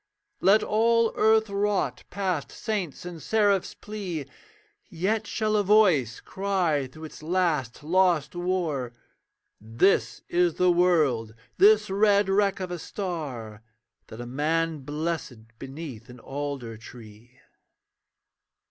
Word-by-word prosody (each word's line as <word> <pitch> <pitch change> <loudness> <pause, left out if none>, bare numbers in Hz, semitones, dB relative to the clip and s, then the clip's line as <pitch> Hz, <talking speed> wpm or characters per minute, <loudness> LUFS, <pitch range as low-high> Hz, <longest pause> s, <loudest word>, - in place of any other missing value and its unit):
Let 200 +3 +4
all 230 +1 +2
earth 220 0 +4
rot 200 -10 -1
past 185 -6 -2
saints' 200 -9 -4
and 175 -3 -7
seraphs' 205 +2 +1
plea, 190 -8 -5 0.6
Yet 210 +6 -1
shall 215 -1 -1
a 205 - +3
Voice 185 - +3
cry 180 -8 -1
through 155 +5 -13
its 155 - -10
last 155 -7 -1
lost 175 -2 +2
war, 170 -9 -2 0.7
'This 115 - +1
is 175 -2 +1
the 180 0 +3
world, 150 -11 +2 0.2
this 410 - +5
red 200 0 +3
wreck 195 0 +2
of 185 -1 -4
a 175 - -4
star, 140 - -5 0.5
That 110 - -11
a 120 - -5
man 155 +5 -1
blessed 140 -6 -5
beneath 135 -4 -8
an 125 0 -12
alder 135 -4 -5
tree.' 115 +2 -14
170 Hz, 120 wpm, -26 LUFS, 135-200 Hz, 0.7 s, this